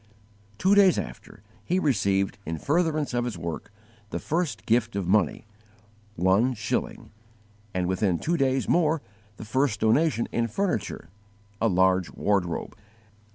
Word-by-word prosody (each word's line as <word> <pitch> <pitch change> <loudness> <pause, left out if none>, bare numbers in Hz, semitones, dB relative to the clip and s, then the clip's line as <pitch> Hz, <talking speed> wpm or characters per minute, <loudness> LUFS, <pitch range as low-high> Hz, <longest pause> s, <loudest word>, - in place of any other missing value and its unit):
_ - - -32
Two 190 - +3
days 200 -3 +6
after, - - -7 0.2
he 180 - 0
received, 100 - +1
in 80 -2 -4
furtherance 155 - 0
of 120 0 +1
his 120 -6 -4
work, 85 +3 -6 0.4
the - - -3
first 160 -8 -2
gift 115 -1 +1
of 100 -3 -2
money 100 -1 +1 0.7
one 100 +9 +2
shilling 110 -2 -3 0.6
and 90 -2 -1
within 95 0 +1
two 170 - -1
days 135 -3 +1
more 160 -3 +2 0.3
the - - -8
first 125 -1 0
donation 115 +3 +2
in 115 0 0
furniture 115 - -2 0.5
a 115 - +4
large 95 -2 +3
wardrobe. 95 -5 -1
110 Hz, 140 wpm, -26 LUFS, 95-145 Hz, 0.7 s, days